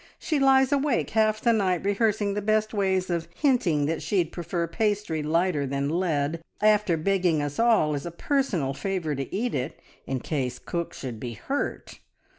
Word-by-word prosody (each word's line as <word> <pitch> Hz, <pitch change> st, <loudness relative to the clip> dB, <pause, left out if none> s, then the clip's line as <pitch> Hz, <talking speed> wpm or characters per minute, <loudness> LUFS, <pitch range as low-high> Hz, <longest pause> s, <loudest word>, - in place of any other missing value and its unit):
She 310 Hz, -3 st, -1 dB
lies 265 Hz, -1 st, +5 dB
awake 285 Hz, -2 st, +1 dB
half 215 Hz, -1 st, +2 dB
the 235 Hz, -, +4 dB
night 190 Hz, -5 st, +1 dB
rehearsing 205 Hz, 0 st, +1 dB
the 210 Hz, -, -2 dB
best 215 Hz, +1 st, +1 dB
ways 190 Hz, -3 st, 0 dB
of 170 Hz, -1 st, -1 dB
hinting 185 Hz, -, +2 dB
that 160 Hz, +2 st, -1 dB
she'd 175 Hz, -5 st, 0 dB
prefer 170 Hz, 0 st, -2 dB
pastry 205 Hz, -3 st, -1 dB
lighter 155 Hz, -1 st, +1 dB
than 140 Hz, +1 st, -1 dB
lead, 160 Hz, -2 st, 0 dB, 0.2 s
after 210 Hz, -5 st, +3 dB
begging 180 Hz, -1 st, +1 dB
us 145 Hz, -1 st, -3 dB
all 225 Hz, -10 st, +4 dB
as 145 Hz, +2 st, -3 dB
a -, -, -3 dB
personal 175 Hz, -, -1 dB
favour 180 Hz, -1 st, -2 dB
to 135 Hz, -1 st, -4 dB
eat 235 Hz, +5 st, -1 dB
it 130 Hz, +3 st, -3 dB, 0.3 s
in 135 Hz, -1 st, -1 dB
case 130 Hz, -2 st, -2 dB
cook 170 Hz, -1 st, -4 dB
should 120 Hz, -4 st, -6 dB
be 120 Hz, 0 st, -5 dB
hurt. 270 Hz, -, -4 dB
180 Hz, 175 wpm, -26 LUFS, 150-215 Hz, 0.3 s, lies